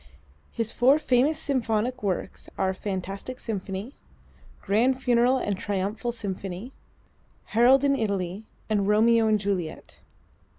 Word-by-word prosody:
His 230 Hz, -1 st, -1 dB
four 265 Hz, +4 st, +4 dB
famous 280 Hz, +1 st, +2 dB
symphonic 250 Hz, -2 st, -1 dB
works 190 Hz, -3 st, -3 dB
are: 190 Hz, -1 st, +1 dB
"Fantastic 195 Hz, +5 st, -5 dB
Symphony," 200 Hz, +2 st, -5 dB, 0.7 s
"Grand 245 Hz, +6 st, +1 dB
Funeral 245 Hz, 0 st, +3 dB
and 205 Hz, -5 st, -1 dB
Triumphal 205 Hz, +5 st, -2 dB
Symphony," 200 Hz, 0 st, -5 dB, 0.8 s
"Harold 250 Hz, +4 st, +5 dB
in 280 Hz, -1 st, +3 dB
Italy" 200 Hz, -3 st, -2 dB, 0.2 s
and 205 Hz, -2 st, 0 dB
"Romeo 225 Hz, +2 st, +4 dB
and 215 Hz, -1 st, +3 dB
Juliet." 190 Hz, -5 st, -4 dB
220 Hz, 115 wpm, -26 LUFS, 195-250 Hz, 0.8 s, Harold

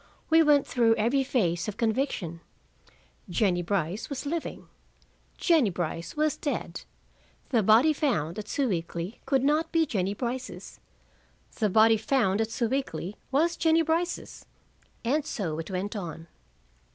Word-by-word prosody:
We 325 Hz, 0 st, +7 dB
went 295 Hz, -3 st, +4 dB
through 230 Hz, -2 st, +3 dB
every 240 Hz, +6 st, +2 dB
phase 175 Hz, -10 st, 0 dB
of 210 Hz, -, -5 dB
conviction: 220 Hz, -, -1 dB, 0.9 s
Jennie 175 Hz, 0 st, +1 dB
Brice 185 Hz, -, -2 dB
was 280 Hz, 0 st, -5 dB
living. 325 Hz, +3 st, -4 dB, 0.7 s
Jennie 320 Hz, -, +3 dB
Brice 170 Hz, -, -4 dB
was 305 Hz, -1 st, +2 dB
dead. 290 Hz, -, -3 dB, 0.7 s
The 235 Hz, -5 st, +3 dB
body 225 Hz, +10 st, +5 dB
found 210 Hz, -, -1 dB
at 210 Hz, -, -7 dB
Sewickley 180 Hz, -5 st, -2 dB
could 270 Hz, -1 st, +2 dB
not 305 Hz, +3 st, +1 dB
be 330 Hz, -1 st, +3 dB
Jennie 200 Hz, -7 st, -1 dB
Brice's. 250 Hz, +2 st, -5 dB, 0.8 s
The 215 Hz, -3 st, +2 dB
body 220 Hz, +3 st, +5 dB
found 220 Hz, -3 st, +1 dB
at 220 Hz, -, -1 dB
Sewickley 225 Hz, -, -2 dB, 0.2 s
was 325 Hz, +5 st, +2 dB
Jennie 325 Hz, 0 st, +3 dB
Brice's. 335 Hz, +2 st, -2 dB, 0.6 s
And 290 Hz, +6 st, +1 dB
so 170 Hz, -, -3 dB
it 165 Hz, -, -6 dB
went 195 Hz, +3 st, -3 dB
on. 165 Hz, -5 st, -6 dB
225 Hz, 135 wpm, -27 LUFS, 185-285 Hz, 0.9 s, We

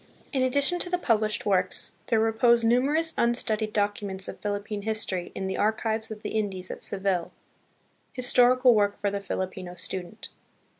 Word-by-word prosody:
23 265 Hz, -, 0 dB
In 255 Hz, -, +3 dB
addition 285 Hz, +7 st, +2 dB
to 355 Hz, -, -4 dB
the 360 Hz, -, +1 dB
published 215 Hz, -8 st, 0 dB
works, 185 Hz, -3 st, 0 dB, 0.2 s
there 225 Hz, -2 st, +2 dB
repose 230 Hz, +1 st, +3 dB
nu 235 Hz, +2 st, +4 dB
merous 315 Hz, +4 st, +1 dB
unstudied 220 Hz, -2 st, +1 dB
documents 205 Hz, -2 st, -1 dB
of -, -, -8 dB
Philippine 205 Hz, 0 st, -4 dB
history 205 Hz, -4 st, -1 dB
in 190 Hz, -, -4 dB
the 190 Hz, -, -2 dB
the -, -, -4 dB
Archives 220 Hz, +1 st, 0 dB
of 215 Hz, -1 st, -8 dB
the -, -, -4 dB
Indies 195 Hz, -4 st, -2 dB
at -, -, -6 dB
Seville. 190 Hz, -3 st, 0 dB, 0.8 s
Historical 250 Hz, 0 st, +4 dB
Work 205 Hz, -2 st, +1 dB
for 200 Hz, -1 st, -1 dB
the 200 Hz, 0 st, -3 dB
Filipino 185 Hz, -2 st, -5 dB
Student. 185 Hz, +3 st, -4 dB
215 Hz, 170 wpm, -26 LUFS, 195-240 Hz, 0.8 s, nu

